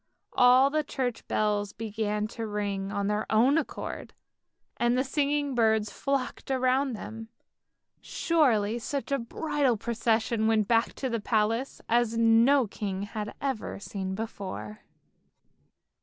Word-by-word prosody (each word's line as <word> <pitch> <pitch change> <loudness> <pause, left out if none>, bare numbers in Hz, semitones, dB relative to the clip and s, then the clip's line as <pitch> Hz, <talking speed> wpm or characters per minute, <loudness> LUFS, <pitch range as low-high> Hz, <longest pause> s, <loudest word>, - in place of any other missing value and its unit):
All 255 +2 +6
the 310 0 +1
church 250 -5 -3
bells 205 -1 0
began 210 -1 -2
to 225 -1 -5
ring 200 -2 -3
of 200 -1 -1
their 210 +1 -1
own 250 +8 +4
accord, 315 - -6 0.6
and 240 +1 +2
the 260 - +2
singing 285 0 0
birds 220 -3 +2
flocked 275 -2 -3
around 260 0 +1
them. 225 +1 -8 0.7
Surely 240 - +1
such 280 +4 -4
a 275 - +2
bridal 280 0 0
procession 225 0 0
went 220 -2 +2
back 230 0 +2
to 265 - -3
the 230 -3 -2
palace 225 +4 0
as 230 -1 +2
no 230 +4 +5
king 195 -2 -4
had 210 0 -5
ever 265 -5 -3
seen 190 -2 -4
before 185 - -6
225 Hz, 130 wpm, -28 LUFS, 210-260 Hz, 0.7 s, All